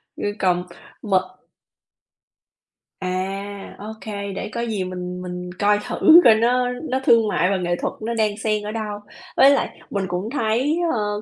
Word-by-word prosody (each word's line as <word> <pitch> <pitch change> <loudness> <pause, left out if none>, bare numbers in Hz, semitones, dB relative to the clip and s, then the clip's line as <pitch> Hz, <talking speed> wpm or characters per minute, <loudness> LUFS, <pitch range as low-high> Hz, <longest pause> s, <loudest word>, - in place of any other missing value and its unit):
Ư, 205 - -2
cồng 180 -1 +2 0.4
m 205 - -4 1.9
À, 195 +2 -4
OK, 220 +1 -9 0.3
để - - -4
có 235 - -2
gì 220 -5 -2
mình 180 0 -5
mình 180 0 -6
coi 205 0 +3
thử 330 +2 +7
coi 225 - +7
nó 245 +3 +2 0.2
nó 260 +1 0
thương 230 -3 +5
mại 180 -3 +1
và 195 - +1
nghệ 175 -1 -1
thuật - - -2
nó 230 +2 -2
đang 215 -2 0
xen 215 -1 -1
ở 210 - -4
đâu. 215 -2 -4 0.4
Với 270 - +8
lại 280 - +1 0.2
mình 200 -2 -2
cũng 180 +4 -3
thấy, 255 +4 0 0.2
ơ, 210 -2 -1
210 Hz, 165 wpm, -22 LUFS, 185-225 Hz, 1.9 s, Với